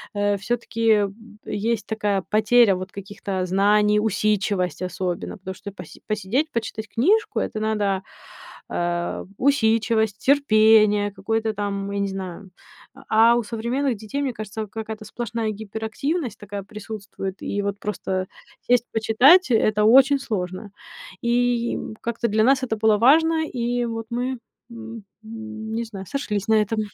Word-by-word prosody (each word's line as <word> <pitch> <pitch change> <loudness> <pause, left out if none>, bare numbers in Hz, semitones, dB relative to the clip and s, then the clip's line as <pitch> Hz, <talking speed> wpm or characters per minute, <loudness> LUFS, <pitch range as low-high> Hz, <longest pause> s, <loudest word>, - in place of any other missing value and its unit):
э, 205 0 +1
всё-таки, 230 +2 -2
м, 210 +1 -1
есть 225 +2 -1
такая 205 -3 -1
потеря 215 -1 +4
вот 185 +1 -6
каких-то 195 -1 -4
знаний, 210 +3 +3
усидчивость 200 -5 0
особенно. 180 +2 -3
Потому 190 0 -7
что 200 - -8
поси 180 -4 -12
посидеть, 215 +10 -1
почитать 220 -1 -4
книжку 390 - +2
это 215 - -3
надо, 205 -3 0 0.7
а, 175 0 -2
усидчивость, 225 -5 +2
терпение, 215 -6 +4
какое-то 220 +2 -2
там, 200 -1 -3
я 200 - -2
не 200 - 0
знаю. 190 0 -7 0.6
А 225 +2 +6
у 240 - 0
современных 235 +4 -1
детей, 220 +8 -4
мне 265 -3 -1
кажется, 215 0 -6
какая-то 220 0 -7
сплошная 230 -2 -3
гиперактивность 220 - -3
такая 205 -1 -6
присутствует. 200 -2 -7
И 205 - -2
вот 200 0 -3
просто 190 -2 -3 0.4
сесть 245 -1 +3
почитать, 250 +9 +5
это 215 -1 +3
очень 270 +4 +6
сложно. 195 -4 -4 0.5
И 240 0 +1 0.2
как-то 235 0 -2
для 215 +1 +2
нас 265 +2 +4
это 225 -3 -1
было 215 0 +3
важно. 320 +7 +4
И 240 -1 -1
вот 225 -1 -5
мы, 250 +1 -2 0.3
м, 230 -1 -9 0.2
не 220 0 -5
знаю, 195 -4 -8
сошлись 210 -7 -3
на 220 - +4
этом. 215 +1 -2
220 Hz, 140 wpm, -23 LUFS, 200-235 Hz, 0.7 s, А